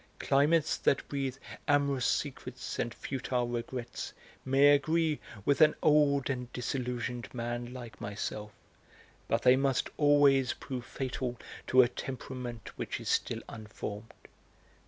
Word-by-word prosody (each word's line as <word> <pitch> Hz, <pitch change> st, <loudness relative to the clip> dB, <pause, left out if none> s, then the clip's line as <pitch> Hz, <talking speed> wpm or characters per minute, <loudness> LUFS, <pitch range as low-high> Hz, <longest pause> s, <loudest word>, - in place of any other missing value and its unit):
Climates 150 Hz, +3 st, +3 dB
that -, -, +1 dB
breathe 135 Hz, -2 st, -2 dB, 0.3 s
amorous 140 Hz, -3 st, +2 dB
secrets 130 Hz, -3 st, -3 dB
and 120 Hz, -, 0 dB
futile 125 Hz, 0 st, -2 dB
regrets 120 Hz, 0 st, -4 dB, 0.3 s
may 135 Hz, +2 st, +5 dB
agree 155 Hz, +1 st, +2 dB, 0.3 s
with 140 Hz, +2 st, +2 dB
an 155 Hz, -1 st, +7 dB
old 145 Hz, -3 st, +4 dB
and 125 Hz, -3 st, -3 dB
disillusioned 125 Hz, -1 st, -3 dB
man 120 Hz, 0 st, -3 dB
like 120 Hz, -3 st, -9 dB
myself; 105 Hz, +1 st, -4 dB, 0.8 s
but -, -, +1 dB
they 125 Hz, 0 st, +7 dB
must 135 Hz, -1 st, +1 dB
always 145 Hz, -3 st, +5 dB
prove 125 Hz, -2 st, -6 dB
fatal 125 Hz, -2 st, -3 dB, 0.3 s
to 130 Hz, 0 st, +7 dB
a -, -, +3 dB
temperament 125 Hz, -2 st, -6 dB
which -, -, -3 dB
is -, -, -5 dB
still -, -, 0 dB
unformed. 110 Hz, 0 st, -7 dB
130 Hz, 125 wpm, -31 LUFS, 120-140 Hz, 0.8 s, an